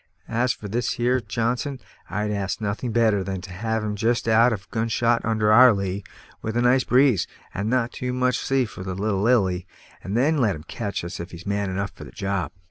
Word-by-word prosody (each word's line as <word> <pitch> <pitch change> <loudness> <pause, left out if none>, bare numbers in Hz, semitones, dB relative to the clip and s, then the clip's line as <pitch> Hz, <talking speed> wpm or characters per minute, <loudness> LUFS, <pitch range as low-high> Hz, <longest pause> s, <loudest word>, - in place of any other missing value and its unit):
As 120 +2 +1
for 105 - -6
this 120 +4 -1
here 125 +2 +1
Johnson, 120 +6 -2 0.3
I'd 105 +3 -1
ask 100 -2 -2
nothing 110 +3 -2
better 110 -4 +3
than 95 0 -3
to 90 - -10
have 110 +4 -2
him 105 -1 -2
just 115 +3 0
out 115 +2 +5
of 100 -4 -4
gun 115 0 0
shot 115 +1 +2
under 110 -2 +2
our 125 +2 +8
lee, 100 0 -3 0.4
with 110 +1 -3
a - - +3
nice 125 +1 +4
breeze, 125 -6 +3 0.3
and 100 +3 -2
not 120 -1 +1
too 125 0 -4
much 125 0 +1
sea 135 -1 +1
for 105 - -9
the 95 -1 -4
little 100 0 -1
Lily, 95 -6 +2 0.4
and 100 +4 -2
then 150 +5 +3
let 110 -7 +2
him 75 - -10
catch 100 +3 -4
us 85 - -6
if 85 +2 -6
he's 85 0 -11
man 100 -1 -1
enough 100 +1 -2
for - - -12
the - - -10
job." 100 -1 -2
110 Hz, 220 wpm, -24 LUFS, 100-120 Hz, 0.4 s, our